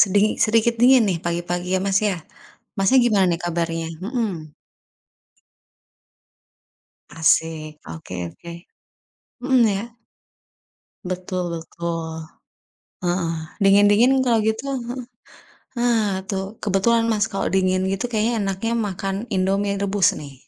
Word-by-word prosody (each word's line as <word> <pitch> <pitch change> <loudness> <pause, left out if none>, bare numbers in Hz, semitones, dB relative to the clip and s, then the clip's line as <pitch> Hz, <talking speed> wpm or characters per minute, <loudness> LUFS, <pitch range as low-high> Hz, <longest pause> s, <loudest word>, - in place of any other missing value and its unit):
Sediki 205 +2 +4
sedikit 230 +1 +2
dingin 255 0 +7
nih 180 - +1
pagi-pagi 175 +1 -2
ya, 185 - +1
Mas, 195 0 +3
ya. 195 - 0 0.6
Masnya 195 +7 +4
gimana 205 -5 +3
nih 170 - -1
kabarnya? 165 -1 -2
Hmm. 190 - -4 2.6
Asik. 160 -1 +1
Oke 80 +3 -8
oke. 170 - -11 0.9
Hmm, 255 -1 +3
ya. 200 +1 -1 1.2
Betul 185 0 -3
betul. 165 -1 -5 0.8
Heeh. 175 -1 0 0.3
Dingin-dingin 205 +7 +5
kalau 235 -3 +3
gitu 220 +4 -1
heeh. 250 -1 -5 0.7
Nah 215 -6 +1
tuh, 195 +2 -4
kebetulan 220 +4 +2
Mas 220 -1 +1
kalau 195 - -3
dingin 185 0 +2
gitu 195 +5 -2
kayaknya 225 0 0
enaknya 195 +4 -2
makan 195 -3 -2
Indomie 195 +1 0
rebus, 200 -2 +1
nih. 145 -2 -9
195 Hz, 110 wpm, -22 LUFS, 175-225 Hz, 2.6 s, dingin